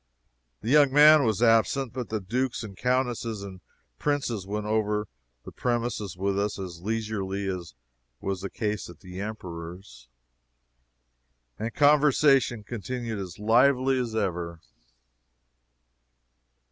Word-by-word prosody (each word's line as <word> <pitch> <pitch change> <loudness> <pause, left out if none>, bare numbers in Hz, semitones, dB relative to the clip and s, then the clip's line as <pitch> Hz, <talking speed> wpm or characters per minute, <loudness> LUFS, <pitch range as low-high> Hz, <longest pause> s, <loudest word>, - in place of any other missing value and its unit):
The 115 - -2
young 145 -2 +6
man 150 0 +7
was 110 0 +1
absent, 115 +3 +3
but 125 -2 -5
the 110 - -1
Dukes 120 +6 -2
and 100 -3 -8
Countesses 120 -2 -1
and 95 -2 -9 0.4
Princes 120 -9 -1
went 105 +1 -3
over 105 -1 0 0.4
the - - -9
premises 120 -6 -2
with 100 +1 0
us 100 0 -1
as 90 -3 -7
leisurely 100 -2 -2
as 90 -8 -5 0.4
was 95 +3 -3
the 100 - -4
case 105 -4 -3
at 85 -2 -13
the 90 0 -9
Emperor's, 90 - -8 1.5
and 110 +2 -3
conversation 145 -5 +4
continued 120 0 -4
as 90 -3 -7
lively 130 +4 +3
as 120 -3 -3
ever. 85 -5 -2
110 Hz, 120 wpm, -27 LUFS, 95-125 Hz, 1.5 s, man